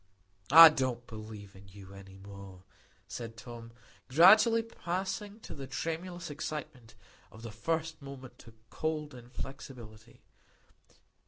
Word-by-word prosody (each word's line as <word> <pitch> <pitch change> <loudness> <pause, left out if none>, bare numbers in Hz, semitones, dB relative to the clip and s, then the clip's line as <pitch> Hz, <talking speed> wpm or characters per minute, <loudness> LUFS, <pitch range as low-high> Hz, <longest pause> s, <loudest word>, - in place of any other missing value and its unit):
"I 165 +3 +11
can't 130 -5 -2
believe 110 -3 -10
in 95 +1 -15
you 95 0 -13
any 95 -1 -13
more," 100 -2 -12 0.4
said 115 -1 -7
Tom, 115 0 -10 0.4
gradually 215 - +6
passing 195 +1 -5
from - - -10
the 135 -1 -7
tremulous 165 +5 -5
excitement 140 -6 -7 0.4
of 110 - -14
the 115 - -7
first 160 +7 -3
moment 135 -2 -11
to 115 -1 -15 0.2
cold 155 -2 -3
inflexibility. 120 -2 -11
130 Hz, 115 wpm, -31 LUFS, 110-160 Hz, 0.4 s, I